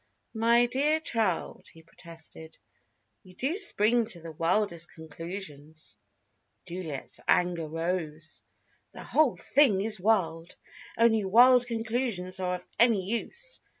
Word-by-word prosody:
"My 235 Hz, +1 st, +3 dB
dear 285 Hz, +6 st, +1 dB
child," 225 Hz, -, -2 dB
he 165 Hz, -, -17 dB
protested. 165 Hz, -1 st, -13 dB, 0.6 s
"You 185 Hz, -3 st, -18 dB
do 275 Hz, -, -1 dB
spring 235 Hz, -, +3 dB
to 185 Hz, -6 st, -6 dB
the 165 Hz, 0 st, -9 dB
wildest 170 Hz, +1 st, -1 dB
conclusions!" 160 Hz, -1 st, -9 dB, 0.7 s
Juliet's 170 Hz, -6 st, -5 dB
anger 175 Hz, -3 st, +1 dB
rose. 165 Hz, -1 st, -4 dB, 0.5 s
"The -, -, -9 dB
whole 305 Hz, -6 st, +2 dB
thing 265 Hz, -9 st, +3 dB
is 215 Hz, 0 st, +1 dB
wild. 175 Hz, -5 st, 0 dB, 0.4 s
Only 225 Hz, -2 st, +3 dB
wild 245 Hz, +5 st, +5 dB
conclusions 225 Hz, -5 st, -2 dB
are 180 Hz, -1 st, -1 dB
of 180 Hz, -, -10 dB
any 215 Hz, -5 st, +3 dB
use. 485 Hz, -, -3 dB
190 Hz, 115 wpm, -28 LUFS, 165-235 Hz, 0.7 s, wild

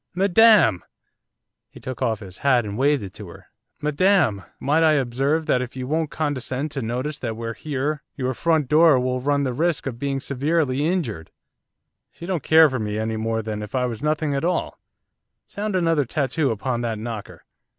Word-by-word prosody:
Madam!' 195 Hz, -, +5 dB, 0.9 s
He -, -, -14 dB
took 130 Hz, -2 st, -7 dB
off 110 Hz, -2 st, 0 dB
his 95 Hz, -3 st, -10 dB
hat 130 Hz, -5 st, +3 dB
and 100 Hz, -1 st, -5 dB
waved 140 Hz, +1 st, +2 dB
it 95 Hz, -, -8 dB
to -, -, -10 dB
her. -, -, -14 dB, 0.3 s
'Madam! 150 Hz, -, +2 dB, 0.2 s
might 150 Hz, +4 st, +2 dB
I 160 Hz, -1 st, +5 dB
observe 140 Hz, +4 st, 0 dB
that 130 Hz, -5 st, +2 dB
if 125 Hz, 0 st, -6 dB
you 130 Hz, -1 st, -4 dB
won't 155 Hz, +3 st, -1 dB
condescend 145 Hz, -1 st, -3 dB
to 135 Hz, -, -3 dB
notice 125 Hz, +6 st, -3 dB
that 115 Hz, -3 st, -4 dB
we're 115 Hz, 0 st, -4 dB
here 145 Hz, +2 st, -3 dB
your 130 Hz, -1 st, -2 dB
front 160 Hz, 0 st, +1 dB
door 155 Hz, -1 st, +5 dB
will 125 Hz, 0 st, -1 dB
run 140 Hz, +1 st, +1 dB
the 130 Hz, -2 st, -1 dB
risk 165 Hz, +4 st, 0 dB
of 120 Hz, -4 st, -5 dB
being 140 Hz, 0 st, -1 dB
severely 145 Hz, +1 st, 0 dB
injured! 130 Hz, -, -2 dB, 0.8 s
She 170 Hz, -, -10 dB
don't 180 Hz, -3 st, -2 dB
care 160 Hz, +3 st, +6 dB
for 130 Hz, -3 st, -3 dB
me 105 Hz, -1 st, -3 dB
any 110 Hz, +1 st, -2 dB
more 110 Hz, 0 st, -2 dB
than 105 Hz, -1 st, -4 dB
if 105 Hz, +3 st, -7 dB
I 125 Hz, -1 st, +1 dB
was 115 Hz, -3 st, -5 dB
nothing 150 Hz, -1 st, 0 dB
at 140 Hz, +2 st, -1 dB
all, 175 Hz, +1 st, -1 dB, 0.7 s
sound 205 Hz, -1 st, -4 dB
another 165 Hz, -4 st, +2 dB
tattoo 140 Hz, +2 st, 0 dB
upon 120 Hz, +2 st, -2 dB
that 115 Hz, -2 st, -2 dB
knocker. 110 Hz, -1 st, -7 dB
135 Hz, 190 wpm, -23 LUFS, 120-155 Hz, 0.9 s, care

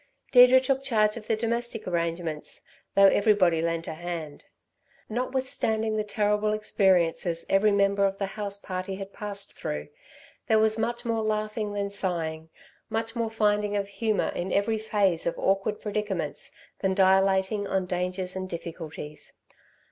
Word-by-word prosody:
Deirdre 250 Hz, 0 st, +8 dB
took 265 Hz, +1 st, 0 dB
charge 215 Hz, -5 st, +2 dB
of 220 Hz, -2 st, -9 dB
the 225 Hz, -, +2 dB
domestic 230 Hz, 0 st, -2 dB
arrangements, 170 Hz, -3 st, -3 dB, 0.3 s
though 200 Hz, -, +7 dB
everybody 195 Hz, -5 st, +4 dB
lent 165 Hz, 0 st, -1 dB
a -, -, -3 dB
hand. 165 Hz, -3 st, -6 dB, 0.6 s
Notwithstanding 225 Hz, -2 st, -1 dB
the 215 Hz, -, 0 dB
terrible 210 Hz, 0 st, +1 dB
experiences 180 Hz, -5 st, +1 dB
every 205 Hz, +2 st, +4 dB
member 200 Hz, 0 st, +3 dB
of 195 Hz, 0 st, -4 dB
the 195 Hz, -, -1 dB
house 200 Hz, 0 st, -3 dB
party 185 Hz, 0 st, -5 dB
had 195 Hz, 0 st, -8 dB
passed 200 Hz, -1 st, -4 dB
through, 75 Hz, 0 st, -5 dB, 0.6 s
there 220 Hz, -, +4 dB
was 220 Hz, 0 st, +4 dB
much 235 Hz, +2 st, -2 dB
more 225 Hz, -1 st, 0 dB
laughing 215 Hz, -1 st, -2 dB
than 200 Hz, -1 st, -2 dB
sighing, 165 Hz, -5 st, -1 dB, 0.4 s
much 225 Hz, +1 st, -3 dB
more 230 Hz, -1 st, -1 dB
finding 210 Hz, -1 st, +1 dB
of 200 Hz, -1 st, -2 dB
humour 215 Hz, +1 st, -1 dB
in 180 Hz, +2 st, -3 dB
every 220 Hz, +2 st, +1 dB
phase 200 Hz, -6 st, +1 dB
of 170 Hz, -, -1 dB
awkward 195 Hz, +2 st, 0 dB
predicaments 205 Hz, -8 st, -3 dB, 0.3 s
than 190 Hz, -1 st, 0 dB
dilating 190 Hz, +1 st, +3 dB
on 190 Hz, -1 st, 0 dB
dangers 180 Hz, +1 st, -2 dB
and 185 Hz, 0 st, -4 dB
difficulties. 160 Hz, -3 st, -7 dB
200 Hz, 150 wpm, -27 LUFS, 180-215 Hz, 0.6 s, Deirdre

